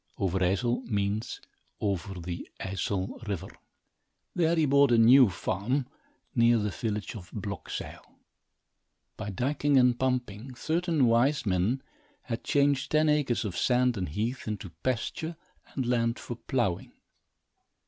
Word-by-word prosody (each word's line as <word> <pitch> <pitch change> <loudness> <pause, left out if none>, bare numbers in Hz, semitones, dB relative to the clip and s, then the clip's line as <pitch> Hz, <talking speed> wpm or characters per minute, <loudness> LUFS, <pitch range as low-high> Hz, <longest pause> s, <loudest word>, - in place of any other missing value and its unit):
Overijssel 95 +6 +1
means 105 0 -1 0.4
over 95 -2 -2
the 85 0 -6
Ijssel 95 +1 -3
River. 95 -2 -4 0.8
There 170 -2 +2
he 160 -2 +3
bought 140 -1 +5
a 120 - +5
new 120 +1 +7
farm, 110 +9 -1 0.5
near 115 0 +4
the 105 -2 -1
village 105 0 -3
of 90 -6 -9
Blokzyl. - - -6 1.1
By 105 -1 -5
dyking 140 +7 +1
and 125 -1 +3
pumping, 125 -2 -2
certain 160 0 +1
wise 120 +5 +3
men 100 +7 +1 0.4
had 115 -1 -4
changed 140 -1 +2
ten 155 0 +3
acres, 145 -7 +1
of 95 -4 -4
sand 125 +5 +2
and 90 -6 -3
heath, 115 - -3
into 100 -4 -4
pasture 130 +6 -2 0.4
and 130 - -1
land 115 -1 +1
for 120 - -6
plowing. 120 -7 -2
120 Hz, 130 wpm, -28 LUFS, 100-135 Hz, 1.1 s, new